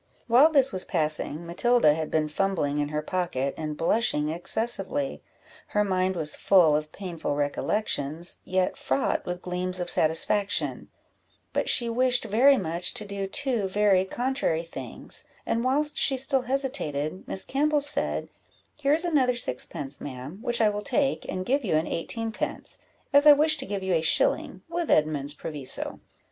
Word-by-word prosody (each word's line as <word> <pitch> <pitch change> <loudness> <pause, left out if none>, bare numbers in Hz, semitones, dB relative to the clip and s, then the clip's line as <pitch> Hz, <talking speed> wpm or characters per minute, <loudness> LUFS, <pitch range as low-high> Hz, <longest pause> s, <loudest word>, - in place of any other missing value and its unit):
While 250 +7 +6
this 275 -4 +4
was 185 -1 +1
passing, 155 +1 -2
Matilda 180 0 +3
had 160 0 -3
been 155 -1 +1
fumbling 150 -4 -1
in 145 0 -1
her 150 0 -3
pocket, 150 -6 -2
and 155 -1 -5
blushing 165 -5 +1
excessively; 225 - -1 0.5
her 210 - +1
mind 185 -1 0
was 155 -3 -1
full 170 -6 +4
of 150 0 -2
painful 175 -7 -4
recollections, 150 +1 -2
yet 185 0 0
fraught 135 +1 0
with 180 0 -4
gleams 180 0 -3
of 175 -1 -1
satisfaction; 165 +6 0 0.6
but - - 0
she 240 - +4
wished 245 +1 +2
very 250 +6 +5
much 170 -1 -1
to 210 - -1
do 200 -1 -4
two 240 -3 -1
very 195 -1 +3
contrary 240 -5 -1
things, 165 - -7 0.2
and 230 - 0
whilst 295 +4 +1
she 270 - +3
still 270 +1 +1
hesitated, 245 - -2
Miss 190 - -1
Campbell 295 +2 +1
said 290 +1 -1 0.5
"Here 290 0 +1
is 330 +3 0
another 270 -7 +2
sixpence, 140 - -2
ma'am, 140 +6 -7
which 240 -1 -1
I 215 - +5
will 205 0 -3
take, 270 +3 0
and 185 0 -3
give 275 +5 +1
you 185 -8 0
an 155 +1 +1
eighteen 225 +7 -3
pence, 215 - -5 0.3
as 285 +1 +6
I 295 - +11
wish 310 +2 +3
to 265 - -4
give 200 -2 -3
you 190 -1 0
a 165 - +2
shilling, - - +1
with 340 0 -3
Edmund's 150 -2 +1
proviso." 145 -4 -3
195 Hz, 165 wpm, -26 LUFS, 160-255 Hz, 0.6 s, I